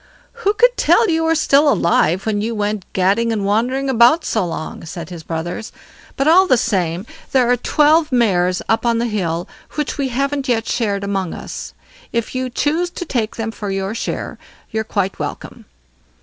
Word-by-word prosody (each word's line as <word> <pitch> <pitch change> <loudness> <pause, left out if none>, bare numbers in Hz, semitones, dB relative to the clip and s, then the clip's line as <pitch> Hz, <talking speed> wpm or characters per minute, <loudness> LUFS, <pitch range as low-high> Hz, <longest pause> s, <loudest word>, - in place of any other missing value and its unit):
"Who 410 -1 +1
could - - +4
tell 455 -5 +4
you 325 0 +1
were 325 0 +3
still 290 -1 +4
alive, 175 - +2
when 210 -2 0
you 225 +2 -2
went 210 -2 -3
gadding 200 +5 +2
and 210 -3 -1
wandering 245 +7 0
about 255 +5 +4
so 220 - 0
long?" 165 -1 -6
said 165 +1 -7
his 170 -2 -7
brothers. 170 +6 -5 0.5
"But 275 - +1
all 370 +4 +6
the 255 - +4
same; 185 -5 -1 0.3
there 250 -2 +4
are - - +5
twelve 305 +5 +3
mares 185 -7 +2
up 225 - +1
on 235 -1 +2
the 235 - 0
hill 175 -6 -2 0.3
which 300 -1 -3
we 275 - +1
haven't 275 +2 -1
yet 225 -2 +1
shared 200 -4 -1
among 195 -3 -2
us; - - -8 0.4
if 235 -1 -2
you 255 0 -2
choose 315 +8 0
to 350 - -6
take 230 -7 -2
them 225 -1 -3
for 210 -2 -6
your 195 +1 -2
share, 230 - -4 0.3
you're 220 0 -1
quite 200 -3 -2
welcome." - - -6
230 Hz, 185 wpm, -19 LUFS, 195-275 Hz, 0.5 s, all